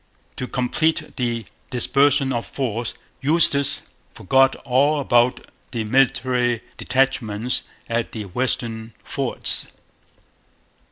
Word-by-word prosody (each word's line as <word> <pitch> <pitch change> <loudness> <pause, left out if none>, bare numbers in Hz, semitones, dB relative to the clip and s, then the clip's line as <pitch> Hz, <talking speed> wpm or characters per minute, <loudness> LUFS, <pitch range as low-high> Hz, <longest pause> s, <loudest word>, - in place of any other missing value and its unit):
To 130 - -3
complete 145 +6 -1
the 120 -3 -2 0.2
dispersion 135 +2 +2
of 120 -1 -3
force, 120 -3 -3 0.3
Eustis 145 -2 +5 0.3
forgot 135 +7 +3
all 140 +4 +2
about 120 -2 +2 0.2
the 115 -4 -3
military 125 0 +1 0.2
detachments 125 -3 0 0.2
at 115 0 -2
the 110 - -5
western 115 +1 -3
forts. - - -1
125 Hz, 95 wpm, -22 LUFS, 115-135 Hz, 0.3 s, Eustis